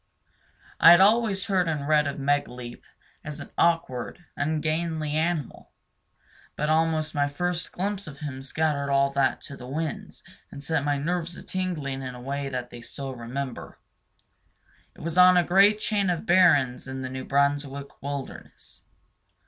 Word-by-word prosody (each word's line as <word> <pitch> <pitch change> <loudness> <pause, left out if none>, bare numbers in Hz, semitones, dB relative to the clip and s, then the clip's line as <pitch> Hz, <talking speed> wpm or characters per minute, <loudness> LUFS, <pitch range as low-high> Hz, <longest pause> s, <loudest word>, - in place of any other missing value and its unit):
I 165 - +9
had 175 +1 +9
always 205 -1 +3
heard 185 -4 +1
and 150 -3 -2
read 150 -1 +3
of 140 - -4
Megaleep 135 -4 -2 0.4
as 150 0 -7
an 145 - -9
awkward, 165 -1 0
ungainly 155 +1 -1
animal, 160 -3 -2 0.8
but 150 +1 0
almost 155 -1 +1
my 145 -1 +1
first 175 +4 -3
glimpse 200 +1 -3
of 145 -2 -9
him 140 -3 -6
scattered 140 0 -1
all 140 0 +3
that 140 -1 +1
to 140 - -9
the 125 -2 -10
winds 155 +3 -5 0.3
and 140 - -10
set 160 -2 0
my 145 0 0
nerves 170 +3 -2
a - - -10
tingling 155 -8 -3
in 130 -1 -6
a - - -9
way 140 +2 -4
that 125 -2 -5
they 120 - -10
still 135 +3 -7
remember. 125 +2 -6 1.2
It - - -14
was 165 +3 -1
on 180 0 +8
a 175 - +5
great 200 +4 +5
chain 205 -3 0
of 175 +3 -2
barrens 160 - +4
in 130 0 -5
the 130 - -4
New 130 0 -5
Brunswick 140 0 -1
wilderness. 140 -1 -8
150 Hz, 160 wpm, -26 LUFS, 140-170 Hz, 1.2 s, I